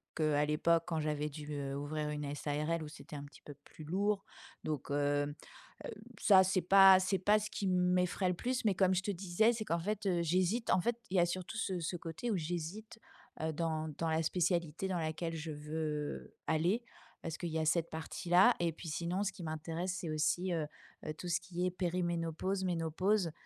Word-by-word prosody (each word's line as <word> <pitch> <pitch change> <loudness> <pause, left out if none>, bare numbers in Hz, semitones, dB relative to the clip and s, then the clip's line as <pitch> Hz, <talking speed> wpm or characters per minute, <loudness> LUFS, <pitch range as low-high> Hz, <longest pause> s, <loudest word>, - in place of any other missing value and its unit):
que 155 -1 +2
à 145 0 +3
l'époque, 165 +2 +2
quand 165 -2 -1
j'avais 150 -1 -1
dû, 150 0 -7
heu, 140 -1 -3
ouvrir 150 +1 -3
une 150 -1 -3
SARL 150 +3 -1
où - - -6
c'était 150 0 -10
un 140 - -5
petit 145 - -14
peu 145 - -9
plus 155 - -12
lourd. 195 +4 0 0.4
Donc 150 -3 -3
hem, 145 0 +1 0.5
heu, - - -5 0.3
ça 190 -2 +7
c'est 185 0 +1
pas 195 +1 +8
c'est 190 +1 0
pas 205 +3 +4
ce 215 0 -5
qui 200 - -2
m'effraie 180 0 +2
le - - +1
plus. 250 +5 -2
Mais 205 - +4
comme 190 0 +3
je 185 - 0
te 205 - -1
disais, 195 +5 +2
c'est 220 -2 -4
qu'en 170 -3 0
fait, 205 +3 -2
heu, 175 -2 +2
j'hésite 185 +7 +1
en 185 - +4
fait, 235 +5 +1 0.2
il 190 - +2
y - - +6
a 175 - +5
surtout 185 +5 -4
ce 190 -5 -1
ce 170 +2 -2
côté 170 +8 -4
où - - +1
j'hésite 175 +7 -5 0.4
heu, 160 0 -1
dans 160 0 -1
dans 165 - 0
la 160 +1 +1
spécialité 170 0 0
dans 185 -2 -1
laquelle 165 +1 -2
je 160 0 -5
veux 150 0 -4
aller 175 +9 +2 0.4
parce 165 -1 -4
qu'il 175 - -3
y 160 0 -1
a 160 - 0
cette 165 +1 +2
partie-là 175 +6 +3
et 170 -1 +2
puis 165 +2 -10
sinon 170 +5 -1
ce 195 -1 -2
qui 180 - -9
m'intéresse, 165 +3 -3
c'est 170 - -4
aussi, 165 +4 +1
heu 160 -3 -1 0.4
heu, 155 - -3
tout 180 - -7
ce 175 0 +1
qui 180 -1 -3
est - - +2
périménopause, 175 +1 -1
ménopause, 180 +2 +1
170 Hz, 210 wpm, -34 LUFS, 155-185 Hz, 0.5 s, pas